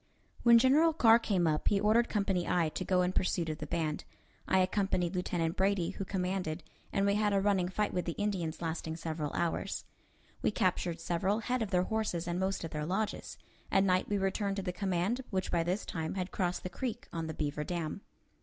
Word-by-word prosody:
When 235 -1 +7
General 295 +7 +5
Carr 230 -6 +6
came 195 -6 +1
up, 155 -1 0
he 200 - +3
ordered 220 +3 +3
Company 195 -4 0
I 170 -3 +2
to 185 - -4
go 180 0 +2
in 180 +1 0
pursuit 175 -3 0
of 155 - -4
the 150 - -5
band. 155 -1 -2 0.4
I 190 - +3
accompanied 185 -1 +1
Lieutenant 175 -2 -1
Brady, 190 -3 +1
who 195 - -5
commanded, 180 -4 -2 0.3
and 195 - +1
we 200 - +3
had 210 0 +2
a 195 - +4
running 195 -3 +2
fight 210 +2 -1
with 180 - -1
the 170 - -2
Indians, 180 -6 -2
lasting 160 -1 -3
several 155 -2 -3
hours. 170 -1 -2 0.6
We - - +2
captured 180 -4 0
several 185 +6 0
head 250 +1 -1
of 220 - -1
their 180 -1 +2
horses 195 -5 -2
and 175 +1 -1
most 190 0 -1
of 165 - -5
their 150 0 -3
lodges. 195 +6 -2 0.3
At 195 - +4
night 185 -1 +2
we 205 - +1
returned 195 +1 0
to 195 - -3
the 180 -1 -3
command, 195 +6 0
which 185 -1 -2
by 170 - +2
this 180 +5 -1
time 160 -2 -3
had 185 -1 -3
crossed 180 -1 -1
the 185 - -3
creek 240 +3 -4
on 165 -1 -3
the 160 - -5
beaver 150 0 -2
dam. 170 +2 -3
185 Hz, 210 wpm, -32 LUFS, 170-200 Hz, 0.6 s, When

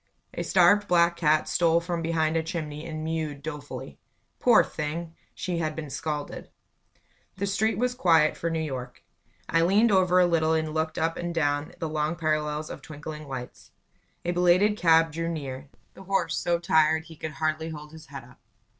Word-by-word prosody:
A - - -4
starved, 200 +3 +4
black 170 -1 +4
cat 155 -2 +2
stole 170 -1 +3
from 170 0 -3
behind 160 -1 0
a 165 - +2
chimney 155 -2 -5
and 155 -1 -5
mewed 155 -3 -3
dolefully. 150 -2 -7 0.4
Poor - - +6
thing! 160 +2 -5 0.2
She 175 -2 -3
had 155 -2 -2
been 150 -3 -6
scalded. 150 +1 -4 0.9
The 200 - -1
street 205 +3 0
was 250 +1 0
quiet 165 -10 +3
for 170 - -2
New 165 - -1
York. 130 -4 -6 0.4
I 165 - +2
leaned 205 +7 +4
over 185 -2 +4
a 180 - +6
little 160 -2 +2
and 160 -1 -1
looked 160 0 -1
up 165 +1 0
and 175 -1 -4
down 145 -2 0
the 165 - -3
long 155 +1 -1
parallels 155 -1 -1
of - - -8
twinkling 150 0 -8
lights. 130 -2 -8 0.5
A 175 - +1
belated 180 +4 +4
cab 165 -3 +4
drew 165 +2 -3
near, 140 -4 -6 0.2
the - - -13
horse 195 -2 0
so 175 -1 +1
tired 160 -2 +3
he 165 -1 -13
could 155 0 -6
hardly 155 +1 -1
hold 150 -1 -9
his 160 -2 -13
head 135 -2 -8
up. 125 +1 -18
160 Hz, 180 wpm, -26 LUFS, 150-170 Hz, 0.9 s, Poor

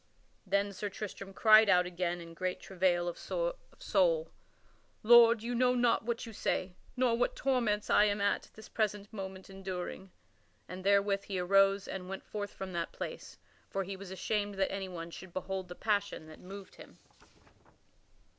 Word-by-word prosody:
Then 200 +1 +1
Sir 205 +2 -4
Tristram 195 -1 -7
cried 215 +1 +6
out 180 -1 +5
again 175 0 -2
in 165 0 -10
great 185 +1 -3
travail 180 -2 +1
of 175 - -4
soul: - - 0 0.7
"Lord, 230 0 +7
you 240 +1 -2
know 250 +1 +3
not 240 -2 +2
what 235 0 -2
you 225 - -9
say, 185 -2 -1 0.2
nor 250 -2 +3
what 245 - 0
torments 235 -6 +1
I 210 - +5
am 205 0 +1
at 200 0 0
this 220 - -11
present 210 -1 -2
moment 190 -2 -7
enduring." 190 0 -6 0.6
And 185 +1 -8
therewith 200 0 +2
he 195 - -3
arose 195 +2 +3
and 185 -1 -6
went 195 - -6
forth 205 -1 -4
from 190 -1 -7
that 170 -1 -2
place, - - -7 0.3
for 195 - -1
he 195 +1 -6
was 190 0 -9
ashamed 205 +2 -2
that 195 0 0
anyone 180 -4 -5
should 180 +1 -10
behold 190 0 -4
the 180 - -8
passion 200 -6 -1
that 155 - -12
moved 195 +1 -11
him. - - -14
195 Hz, 165 wpm, -32 LUFS, 185-215 Hz, 0.7 s, Lord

